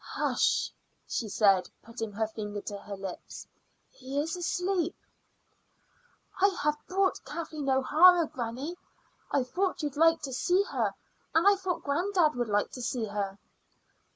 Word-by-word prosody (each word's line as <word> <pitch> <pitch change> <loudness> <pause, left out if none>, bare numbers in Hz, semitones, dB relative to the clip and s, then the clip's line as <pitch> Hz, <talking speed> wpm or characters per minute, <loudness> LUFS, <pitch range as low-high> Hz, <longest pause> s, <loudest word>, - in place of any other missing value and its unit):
"Hush!" - - +1 0.4
she 225 - -2
said, 195 -3 +3
putting 225 -2 -6
her 220 +2 0
finger 210 -1 -5
to 205 - -6
her 200 0 -7
lips; 190 -2 -7 0.5
"he 270 +2 -4
is 320 +4 -1
asleep." 355 0 -1 1.4
"I 395 - +6 0.2
have 300 0 +1
brought 380 +1 +1
Kathleen 310 -4 -5
O'Hara, 325 +6 +6
granny. 270 +4 -5 0.5
I 275 - +2
thought 360 +7 -1
you'd 290 -1 -3
like 325 0 +4
to 270 -2 -4
see 355 +9 +2
her, - - -1 0.4
and 330 +4 +5
I 405 - +7
thought 375 -2 -3
granddad 340 +2 +2
would 240 -2 -2
like 205 0 +1
to 250 - -7
see 240 -1 -1
her." 200 -2 -3
285 Hz, 145 wpm, -29 LUFS, 225-350 Hz, 1.4 s, I